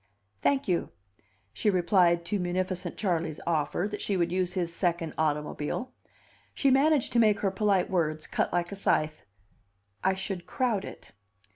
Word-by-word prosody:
"Thank 280 -1 +1
you," 175 -3 0 0.6
she 210 - +1
replied 175 -2 +3
to 205 +3 -1
munificent 180 0 -2
Charley's 170 -6 -1
offer 170 +3 0
that 210 - -4
she 200 - 0
would 170 -1 +1
use 180 -1 0
his 170 -2 -1
second 170 -2 -1
automobile. 150 +9 -2 0.6
She 275 - +3
managed 280 +1 +3
to 240 - +4
make 215 -3 +4
her 195 - +1
polite 195 -2 +2
words 155 -4 -1
cut - - -1
like 175 +1 -1
a - - -4
scythe. 155 - 0 0.8
"I 190 0 +3
should 190 -2 -4
crowd 225 -3 0
it." - - -11
180 Hz, 155 wpm, -28 LUFS, 170-205 Hz, 0.8 s, to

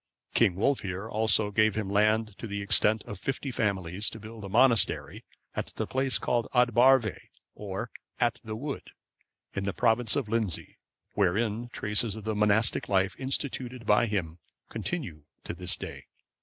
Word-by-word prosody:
King 90 - +3
Wulfhere 95 -3 -1
also 110 -1 +2
gave 110 0 +3
him 110 -2 -2
land 110 +2 +2
of 115 - -5
the 100 0 -3
extent 105 +2 +3
of 105 - -8
fifty 135 +3 -3
families, 100 -4 0
to 110 - -9
build 110 0 -10
a 100 - -6
monastery, 115 0 +3 0.3
at - - -2
the - - -2
place 130 0 0
called 120 -1 0
Ad 125 0 +5
Barvae,(546) 120 -2 +4 0.3
or 105 +3 -6 0.3
"At 120 -1 +1
the 110 -1 -5
Wood," 140 +5 -6 0.6
in 100 0 -3
the 100 - -1
province 115 -1 +2
of 140 -6 -1
Lindsey, 110 -6 -1 0.3
wherein 105 +4 0
traces 105 -1 0
of 110 - -8
the 110 +1 -1
monastic 105 +2 +2
life 95 -2 +2
instituted 130 -2 -2
by 105 +3 +4
him 90 -6 -3 0.3
continue 110 - -5 0.2
to - - -5
this 90 +1 -1
day. - - -8
110 Hz, 160 wpm, -28 LUFS, 100-120 Hz, 0.6 s, Ad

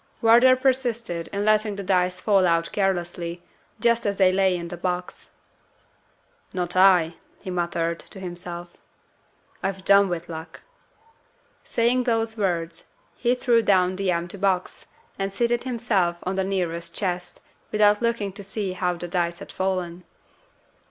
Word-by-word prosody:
Wardour 240 +3 +6
persisted 240 -9 -1
in 200 +1 -2
letting 215 -1 +2
the 200 - -5
dice 180 -1 +1
fall 195 -2 +3
out 165 0 +1
carelessly, 175 -3 -2 0.4
just 235 0 +2
as 200 -1 -1
they 185 -2 +5
lay 190 -1 +2
in 170 0 -6
the 175 - -4
box. 180 0 -4 1.2
"Not 180 -1 -2
I!" 180 -3 +5 0.2
he 185 - -6
muttered 170 -1 -1
to 195 - -10
himself. 175 -1 -7 0.9
"I've 195 -1 -3
done 200 -1 +6
with 175 -1 -4
luck." 160 0 -8 1.0
Saying 240 +2 +1
those 225 -2 0
words, 170 -6 -2 0.3
he 245 0 +1
threw 240 -2 +3
down 185 -3 +3
the 195 0 -1
empty 170 +2 -2
box, 190 -2 -1 0.3
and 195 0 -1
seated 235 +4 0
himself 215 -8 0
on 185 +1 -2
the 190 - +1
nearest 170 -3 -2
chest, 180 -3 -3 0.3
without 210 0 +4
looking 230 -4 -1
to 200 +1 -9
see 195 -1 -3
how 180 -1 -1
the 175 +1 -5
dice 170 -1 -1
had - - -10
fallen. 185 -2 -2
190 Hz, 145 wpm, -24 LUFS, 175-210 Hz, 1.2 s, Wardour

